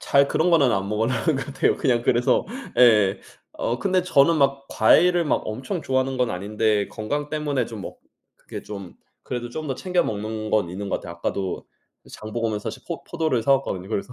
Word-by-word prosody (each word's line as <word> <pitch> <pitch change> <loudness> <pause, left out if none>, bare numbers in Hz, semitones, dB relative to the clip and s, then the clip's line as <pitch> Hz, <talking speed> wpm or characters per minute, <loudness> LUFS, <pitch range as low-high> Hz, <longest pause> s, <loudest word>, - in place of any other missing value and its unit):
잘 140 0 +3
그런 175 +3 +1
거는 145 -7 +5
안 100 0 -1
먹으려고 110 +4 0
하는 135 +5 +1
것 135 - -4
같아요. 135 -1 +1
그냥 120 -4 +1
그래서 120 0 +2 0.3
예. 105 -6 +5 0.4
어 120 - -1
근데 185 +7 +1
저는 165 -2 +4
막 140 -1 +1
과일을 175 +9 +4
엄청 135 - -2
좋아하는 130 0 0
건 125 -2 +1
아닌데 105 +2 0
건강 145 +7 -3
때문에 145 -4 -1
좀 110 -3 -8
먹 - - -8 0.4
그게 - - -9
좀 100 -4 -8 0.3
그래도 120 -1 -4
좀 155 +6 -6
더 135 - -2
챙겨 180 +6 0
먹는 110 +1 -4
건 105 -5 +2
있는 100 +3 -5
것 - - 0
같아요. 85 - -8
아까도 95 +2 -3 0.4
그 - - -18
장 110 0 -9
보고 115 0 -1
오면서 105 -1 -3
사실 - - -11
포 - - -5
포도를 145 -8 -1
사 140 - +4
왔거든요 95 -9 -3
그래서. 110 +3 -3
120 Hz, 385 characters per minute, -23 LUFS, 105-140 Hz, 0.4 s, 거는